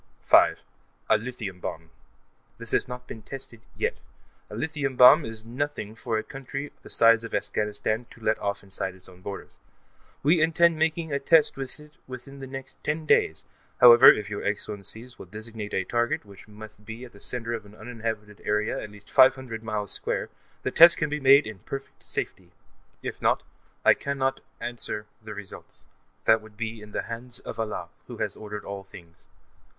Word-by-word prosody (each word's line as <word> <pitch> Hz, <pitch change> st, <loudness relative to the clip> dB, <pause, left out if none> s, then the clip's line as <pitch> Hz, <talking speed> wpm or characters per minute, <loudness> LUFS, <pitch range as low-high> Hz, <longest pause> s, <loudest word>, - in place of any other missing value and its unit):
5.) -, -, +6 dB, 0.5 s
A 110 Hz, -, +7 dB
lithium 110 Hz, -5 st, -6 dB
bomb. 85 Hz, -1 st, -6 dB, 0.7 s
This 115 Hz, -1 st, -8 dB
has -, -, +2 dB
not 125 Hz, 0 st, -7 dB
been 110 Hz, -, -9 dB
tested, 135 Hz, 0 st, -8 dB, 0.2 s
yet. -, -, -1 dB, 0.5 s
A -, -, -8 dB
lithium 145 Hz, 0 st, -2 dB
bomb 125 Hz, +6 st, +8 dB
is 110 Hz, 0 st, -6 dB
nothing 125 Hz, -3 st, -3 dB
for 115 Hz, 0 st, -2 dB
a 110 Hz, -, -2 dB
country 135 Hz, 0 st, -6 dB
the -, -, -13 dB
size 115 Hz, 0 st, +5 dB
of 115 Hz, -, -4 dB
Afghanistan 105 Hz, +3 st, -1 dB
to -, -, -16 dB
let 110 Hz, 0 st, +1 dB
off 100 Hz, 0 st, -2 dB
inside 95 Hz, -1 st, -5 dB
its 95 Hz, -, -14 dB
own 90 Hz, 0 st, -16 dB
borders. 100 Hz, +1 st, -8 dB, 0.6 s
We 155 Hz, +4 st, +4 dB
intend 165 Hz, 0 st, +4 dB
making 160 Hz, -1 st, 0 dB
a 140 Hz, -, +1 dB
test 155 Hz, +2 st, +4 dB
with 135 Hz, +2 st, -7 dB
it 150 Hz, -1 st, -16 dB
within 130 Hz, +2 st, -9 dB
the 135 Hz, -, -7 dB
next 135 Hz, 0 st, -9 dB
ten 155 Hz, +1 st, -2 dB
days, -, -, +3 dB, 0.4 s
however 120 Hz, +1 st, +10 dB
If 105 Hz, -, -2 dB
your 105 Hz, -1 st, -5 dB
Excellencies 105 Hz, +4 st, -3 dB
will -, -, -10 dB
designate 110 Hz, +1 st, -7 dB
a 95 Hz, -, +1 dB
target, 120 Hz, +2 st, 0 dB
which 100 Hz, 0 st, -14 dB
must 105 Hz, 0 st, -12 dB
be 115 Hz, +3 st, -8 dB
at 120 Hz, -, -15 dB
the 100 Hz, -, -15 dB
center 120 Hz, 0 st, -2 dB
of 115 Hz, -, -4 dB
an 105 Hz, -, -16 dB
uninhabited 110 Hz, -2 st, -5 dB
area 105 Hz, +1 st, 0 dB
at 105 Hz, -, -7 dB
least 105 Hz, 0 st, -14 dB
five 130 Hz, -1 st, +7 dB
hundred 120 Hz, -4 st, -7 dB
miles 105 Hz, -2 st, -3 dB
square, -, -, -2 dB, 0.3 s
the -, -, -1 dB
test 170 Hz, +1 st, +8 dB
can 155 Hz, -2 st, -1 dB
be 150 Hz, -, -1 dB
made 140 Hz, +1 st, +7 dB
in 110 Hz, -3 st, -7 dB
perfect 135 Hz, +8 st, -8 dB
safety. 90 Hz, -2 st, -3 dB, 0.5 s
If -, -, -5 dB
not, -, -, +2 dB, 0.4 s
I -, -, +8 dB
cannot 135 Hz, -1 st, -1 dB, 0.2 s
answer 120 Hz, -3 st, -4 dB, 0.2 s
the 105 Hz, -1 st, -7 dB
results; 100 Hz, -1 st, -9 dB, 0.4 s
that 110 Hz, 0 st, +5 dB
will 110 Hz, -, -13 dB
be 110 Hz, +1 st, -5 dB
in 105 Hz, 0 st, -12 dB
the -, -, -2 dB
hands 120 Hz, +1 st, -6 dB
of 115 Hz, -, -8 dB
Allah, 105 Hz, -6 st, -3 dB, 0.2 s
Who -, -, -8 dB
has -, -, -1 dB
ordained 105 Hz, -1 st, -7 dB
all 100 Hz, -1 st, -6 dB
things. 85 Hz, -3 st, -15 dB
115 Hz, 185 wpm, -26 LUFS, 105-135 Hz, 0.7 s, however